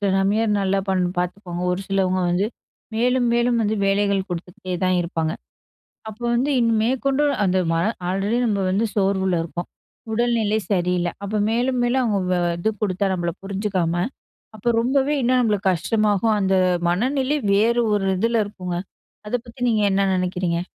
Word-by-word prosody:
சில 200 - +1
மாமியார் 205 +4 +2
பண் 210 - +2
நல்லா 195 0 +1 0.4
பார்த்துக்குவாங்க. 180 0 -3
ஒரு 180 - -2
சிலவங்க 190 -1 +1
வந்து 180 +4 +1 0.5
மேலும், 245 +2 +2
மேலும் 240 0 +2
வந்து 215 0 0
வேலைகள் 200 0 +2
கொடுத்துகிட்டே 180 +1 -6
தான் 185 0 +2
இருப்பாங்க. 165 -2 -2 0.8
அப்போ 220 +3 -10
வந்து 255 +5 +1
இனி 230 -1 +2
மேற்கொண்டு 265 +4 +1 0.2
அந்த 185 -1 +2
ம - - +1 0.3
ஆல்ரெடி 195 +5 0
நம்ம 210 -3 0
வந்து 200 +5 +1
சோர்வுல 190 -3 +1
இருக்கோம். 170 +1 -6 0.5
உடல்நிலை 225 -2 +1
சரியில்ல. 180 -2 +1
அப்ப 210 +1 -1
மேலும் 245 +3 0
மேலும் 250 +2 +2
அவுங்க 190 -5 0 0.2
இது 215 - +1
கொடுத்தா 200 -1 0
நம்மள 175 -2 -1
புரிஞ்சுக்காம, 195 -4 -1 0.6
அப்போ 215 +3 -1
ரொம்பவே 270 +4 +1
இன்னும் 255 +1 +3
நம்மளுக்கு 205 -4 +1
கஷ்டமாகும். 210 +4 +1
அந்த 190 -1 +1 0.4
மனநிலை 260 +9 +1 0.2
வேறு 230 +4 +3
ஒரு 200 -2 +1
இதில 230 +2 +2
இருக்குங்க. 180 -3 -5 0.5
அத 210 - -1
பத்தி 235 +2 -14
நீங்க 220 -2 +2
என்ன 195 0 +2
நினைக்கிறீங்க? 180 -2 -1
200 Hz, 150 wpm, -22 LUFS, 185-230 Hz, 0.8 s, இன்னும்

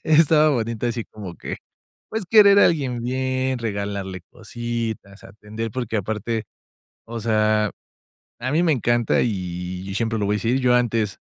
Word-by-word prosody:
Estaba 155 0 +5
bonito, 115 -3 -1
así 115 -1 -2
como 100 -5 -9
que, - - -6 0.5
pues, 220 -3 -3
querer 200 0 +7
a - - +7
alguien 135 -7 0
bien, 130 +1 -1
regalarle 100 -4 -4
cositas, 115 -3 -5
atender, 110 +3 -6
porque 120 -4 -3
aparte, 110 +2 -2 0.6
o 115 0 -6
sea, 110 -1 +2 0.7
a 130 +3 -2
mí 165 +3 +3
me 165 - +3
encanta 120 -3 +2
y 90 -2 -4
siempre 115 +1 -1
lo 100 - 0
voy 105 - +1
a - - -2
decir, 120 +5 +1
yo 125 -1 +3
antes, 115 -4 +1
115 Hz, 155 wpm, -22 LUFS, 105-130 Hz, 0.7 s, querer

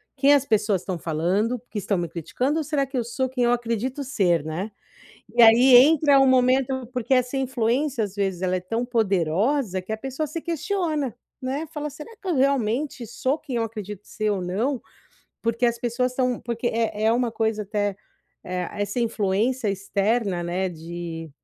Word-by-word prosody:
quem 280 +1 +5
as 285 -2 +4
pessoas 210 -5 +1
estão 185 -1 -4
falando, 180 +10 0
porque 230 -1 -10
estão 200 0 -1
me 170 - -2
criticando 250 - -2
ou - - -1
será 295 -2 0
que 270 0 -5
eu 240 - +1
sou 260 +3 -2
quem 250 -1 -1
eu 240 - +3
acredito 240 +3 -1
ser?" 180 - +1
Né, 170 +8 -4 0.6
e 240 - +6
aí 245 +3 +8
entra 285 +2 +6
um 270 - +5
momento 260 0 +2
porque 250 +1 -2
essa 255 +1 +1
influência, 255 0 0
às 200 -2 -7
vezes, 195 -3 -1
ela 185 0 +1
é - - -2
tão 225 +7 -2
poderosa 200 - +1
que 200 +4 -6
a - - -1
pessoa 270 +6 -3
se 320 +3 -5
questiona, 325 - -1 0.3
né, 275 +5 -2
fala: 300 0 -3
"Será 300 +10 -11
que 400 - -15
eu 350 - +1
realmente 260 -1 0
sou 260 +6 -1
quem 270 -6 -5
eu 230 - +1
acredito 210 -3 -7
ser 215 0 -2
ou 200 -2 0
não?" 225 +9 -1 0.6
Porque 230 +2 0
as 235 -1 +2
pessoas 245 +1 -1
são 250 -2 0
porque 235 +1 -3
é 225 -2 0
é 220 - +4
uma 240 0 +1
coisa 220 -1 0
até 205 -1 -2 0.5
eh, 180 -1 -3
essa 205 +3 -2
influência 220 +1 0
externa, 200 0 0
né, 180 +2 -1
de 165 -1 -7
230 Hz, 190 wpm, -24 LUFS, 200-260 Hz, 0.6 s, aí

